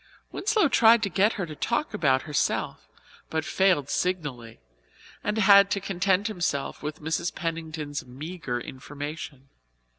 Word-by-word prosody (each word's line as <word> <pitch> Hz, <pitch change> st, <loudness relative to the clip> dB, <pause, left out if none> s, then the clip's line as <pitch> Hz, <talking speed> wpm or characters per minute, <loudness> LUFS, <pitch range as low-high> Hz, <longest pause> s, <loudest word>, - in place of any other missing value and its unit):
Winslow 425 Hz, -2 st, +2 dB
tried 230 Hz, -3 st, +5 dB
to 200 Hz, -, 0 dB
get 200 Hz, +6 st, +3 dB
her 195 Hz, -, -3 dB
to 155 Hz, -2 st, -9 dB
talk 235 Hz, -, -1 dB
about 135 Hz, -10 st, +2 dB
herself, 150 Hz, -3 st, -1 dB, 0.4 s
but 160 Hz, 0 st, -2 dB
failed 185 Hz, -8 st, +2 dB
signally 145 Hz, -9 st, -3 dB, 0.6 s
and 210 Hz, +1 st, -1 dB
had 200 Hz, -1 st, +7 dB
to 200 Hz, -, 0 dB
content 195 Hz, +1 st, 0 dB
himself 175 Hz, -10 st, -2 dB
with 150 Hz, +1 st, -6 dB
Mrs. 160 Hz, +2 st, -2 dB
Pennington's 160 Hz, -3 st, -4 dB
meagre 135 Hz, 0 st, -5 dB
information. 140 Hz, +1 st, -8 dB
165 Hz, 130 wpm, -26 LUFS, 145-200 Hz, 0.6 s, had